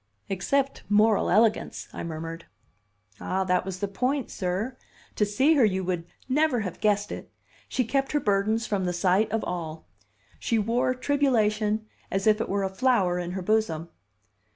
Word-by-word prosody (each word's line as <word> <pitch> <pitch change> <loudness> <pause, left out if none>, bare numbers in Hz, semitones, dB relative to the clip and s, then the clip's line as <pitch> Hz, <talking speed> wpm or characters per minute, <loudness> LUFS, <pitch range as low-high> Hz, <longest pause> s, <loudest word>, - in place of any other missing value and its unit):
"Except 270 +9 0
moral 210 +1 +4
elegance," 215 +3 +2
I - - -5
murmured. 165 0 -6 0.7
"Ah, 190 +1 -1
that 180 -1 +1
was 185 -1 -5
the 200 - 0
point, 250 +6 -1
sir! 190 +7 -2 0.4
To 210 - +2
see 265 +10 +3
her 280 -5 +4
you 190 -3 +2
would 175 -2 -2 0.2
never 270 -2 +2
have 185 -4 -5
guessed 205 -1 +1
it! - - -7 0.4
She 255 - +1
kept 270 +4 0
her 295 - +3
burdens 215 +1 +1
from 200 -4 -1
the 180 - -1
sight 190 +4 +2
of 225 0 0
all. 165 -3 -5 0.5
She 230 - 0
wore 235 +4 +1
tribulation 220 -6 +1 0.2
as 195 0 -1
if 215 0 +4
it - - -3
were 200 0 0
a 190 - 0
flower 190 -5 +2
in 175 0 -4
her 190 -1 -4
bosom. 175 -6 0
210 Hz, 170 wpm, -26 LUFS, 185-235 Hz, 0.7 s, moral